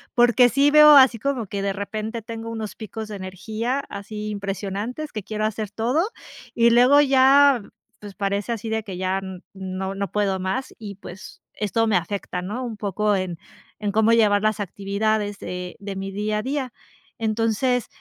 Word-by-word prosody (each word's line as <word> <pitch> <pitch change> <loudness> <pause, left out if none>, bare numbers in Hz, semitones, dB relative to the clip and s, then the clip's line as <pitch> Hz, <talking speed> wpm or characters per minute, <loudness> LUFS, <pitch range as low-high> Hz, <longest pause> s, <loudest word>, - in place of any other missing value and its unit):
porque 245 0 +5
sí 280 +4 +3
veo 300 0 +9
así 260 -4 +7
como 255 -4 -2
que 200 +1 -4
de 200 0 0
repente 215 +3 -4
tengo 225 +1 -7
unos 220 -3 -5
picos 220 0 -7
de 210 - -6
energía 215 +7 -3
así 210 +1 -6
impresionantes, 200 - -4
que 215 -3 -4
quiero 215 +1 -3
hacer 215 -1 -3
todo, 255 - 0 0.4
y 235 0 +4
luego 250 +4 +6
ya, 275 -1 +5 0.4
pues, 205 -2 -10
parece 200 +3 -2
así 225 0 -6
de 220 0 -1
que 195 -4 -7
ya 185 +1 -1
n 190 -2 -8
no 190 0 -5
no 195 -2 -3
puedo 200 -2 0
más, 220 +9 -3
y 205 -3 -8
pues 190 -1 -11
esto 225 +2 0
me 215 - +2
afecta, 180 0 -4
¿no? 210 +8 -4
Un 230 -2 -5
poco 210 +1 0
en 185 -3 -3 0.4
en 210 -1 -1
cómo 220 +1 +4
llevar 210 -3 +4
las 215 0 +1
actividades 205 +2 -1
de 180 0 -6
de 200 -1 -6
mi 195 0 -4
día 210 +2 -2
a - - -1
día. 265 0 -3 0.4
Entonces 225 +2 0
215 Hz, 180 wpm, -23 LUFS, 195-235 Hz, 0.4 s, veo